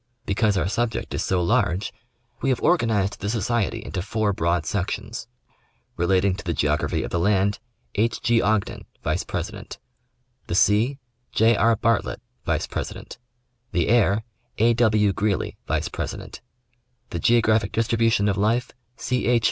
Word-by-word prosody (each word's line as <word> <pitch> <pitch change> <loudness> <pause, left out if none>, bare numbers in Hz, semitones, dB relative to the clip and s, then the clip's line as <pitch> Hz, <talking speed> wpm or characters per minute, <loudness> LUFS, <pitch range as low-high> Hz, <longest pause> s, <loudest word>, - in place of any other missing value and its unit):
Because 100 +1 +1
our 90 -2 +1
subject 115 +3 -2
is - - -1
so 90 -2 +1
large 100 -2 +1 0.5
we 135 - +1
have 130 - +1
organized 115 - +2
the 100 - -3
society 115 0 -1
into 95 - -3
four 105 +2 0
broad 85 -2 0
sections: 105 +5 -3 0.7
relating 95 +2 +2
to 100 - -7
the 85 -3 -2
geography 75 0 0
of - - -6
the 85 - 0
land, 100 +2 +2 0.3
H. 115 +3 0
G. 115 -1 +2
Ogden, 105 -1 0 0.2
vice - - 0
president; - - -5 0.7
the 85 - -2
sea, 110 +8 +3 0.4
J. 115 +1 +4
R. 115 +2 +4
Bartlett, 115 0 0 0.3
vice - - +1
president; - - -6 0.5
the 85 0 +1
air, 110 -2 +3 0.3
A. 115 +2 +4
W. 110 -4 +3
Greely, 100 -1 -1
vice - - 0
president; - - -6 0.7
the 85 - -3
geographic 110 0 +3
distribution 115 -2 +2
of 100 -1 +1
life, 115 +5 +1 0.3
C. 125 -2 -1
H. 120 -1 +4
105 Hz, 150 wpm, -24 LUFS, 95-115 Hz, 0.7 s, J